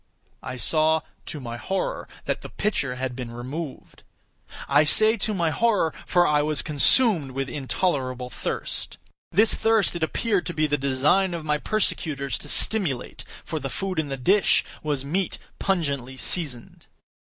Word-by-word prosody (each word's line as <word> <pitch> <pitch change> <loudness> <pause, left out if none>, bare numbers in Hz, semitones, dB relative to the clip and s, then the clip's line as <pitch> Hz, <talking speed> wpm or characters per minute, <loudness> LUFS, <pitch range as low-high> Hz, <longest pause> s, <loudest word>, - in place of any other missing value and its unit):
I 130 - -6
saw, 155 +4 +3 0.3
to 150 - -5
my 120 -3 -6
horror, 190 +9 -3 0.2
that - - -2
the - - -9
pitcher 140 -11 -1
had 130 -1 -4
been 125 -2 -6
removed. 130 +6 -7 0.7
I 145 +2 +5
say 215 +9 +5
to 215 - -1
my 170 -3 +1
horror—for 180 -3 +1
I 150 -2 +3
was 150 0 0
consumed 155 - +3
with 135 0 -2
intolerable 130 -2 -2
thirst. - - -4 0.3
This 215 +4 +5
thirst 225 -5 +2
it 170 - -4
appeared 195 +4 0
to 175 - -4
be 155 -1 +2
the 145 -1 +1
design 145 +7 +2
of 165 -2 -6
my 150 -1 +1
persecutors 150 -9 -1
to 145 - -8
stimulate—for 160 - 0
the 135 - -4
food 190 0 -3
in 155 - -1
the 135 -1 -4
dish 190 +9 +3 0.2
was 145 -3 -2
meat 185 +6 -1 0.2
pungently 140 -9 -1
seasoned. 130 -5 -2
155 Hz, 155 wpm, -24 LUFS, 135-185 Hz, 0.7 s, I